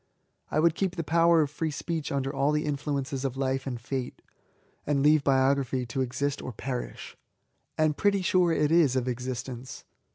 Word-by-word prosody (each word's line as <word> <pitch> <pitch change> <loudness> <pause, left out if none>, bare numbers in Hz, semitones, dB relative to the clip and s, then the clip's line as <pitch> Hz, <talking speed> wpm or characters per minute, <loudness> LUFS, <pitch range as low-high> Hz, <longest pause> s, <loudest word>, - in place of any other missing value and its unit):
I 155 - 0
would 165 +1 +4
keep 185 +1 -1
die 165 - -2
power 165 +1 +4
of 145 -2 -1
free 160 +1 -2
speech 160 +1 -4
under 135 0 -1
all 140 +1 +1
the 150 +1 0
influences 140 -2 -2
of 135 -1 -2
life 135 0 -1
and 125 -2 -3
fatcy 125 +1 -4 0.4
— - - -38
and 140 -2 +1
leave 150 0 +5
Biography 135 -1 +2
to 120 +3 -3
exist 140 +3 -2
or - - -5
perish. 125 +2 -6 0.6
And 155 -1 +2
pretty 200 +1 +1
sure 180 -1 +3
it 150 -2 +1
is 160 -6 +4
of 130 -1 0
existence. 125 0 -5
140 Hz, 185 wpm, -28 LUFS, 130-155 Hz, 0.6 s, leave